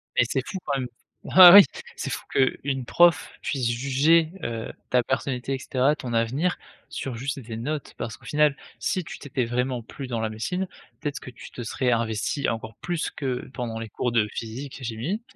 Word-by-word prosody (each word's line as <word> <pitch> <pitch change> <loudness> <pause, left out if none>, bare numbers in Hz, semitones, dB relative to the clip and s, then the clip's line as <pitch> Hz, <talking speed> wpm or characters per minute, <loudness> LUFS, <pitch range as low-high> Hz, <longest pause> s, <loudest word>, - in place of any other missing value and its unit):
Mais - - +5
c'est 130 -2 -1
fou - - -4
quand 140 - 0
même 125 - -3 0.4
bah 180 -1 +10
oui, 200 +1 +12 0.3
c'est - - -3
fou - - -4
qu'une 135 0 0
prof 170 +3 +4
puisse 130 -4 -1
juger, 140 +7 +3
heu, 115 -1 -4 0.2
ta 125 -1 +4
personnalité 130 0 -2
et - - 0
caetera, 130 +2 +1
ton 125 -5 -6
avenir, 130 +10 +1 0.3
sur 130 -3 -4
juste 135 +2 -3
des 115 -3 -7
notes. 145 +5 -4
Parce 115 - -4
qu'au - - -23
final, 150 -1 +3 0.2
si 185 - -1
tu - - -9
t'étais 135 -3 -2
vraiment 125 +1 -1
plu 135 +4 -8
dans 120 -3 -2
la 110 - -1
médecine, 180 +13 -3 0.3
peut-être 145 -2 -3
que 130 - -10
tu 115 - -12
te 120 - -7
serais 125 +3 0
investie 115 +4 0
encore 110 -1 -3
plus 175 -3 -2
que 130 -3 -4
pendant 120 -2 -4
les 115 - -6
cours 120 +3 -2
de 110 -3 +3
physique 130 +5 -6
et - - -10
chimie. 120 - -3
130 Hz, 200 wpm, -25 LUFS, 115-145 Hz, 0.4 s, oui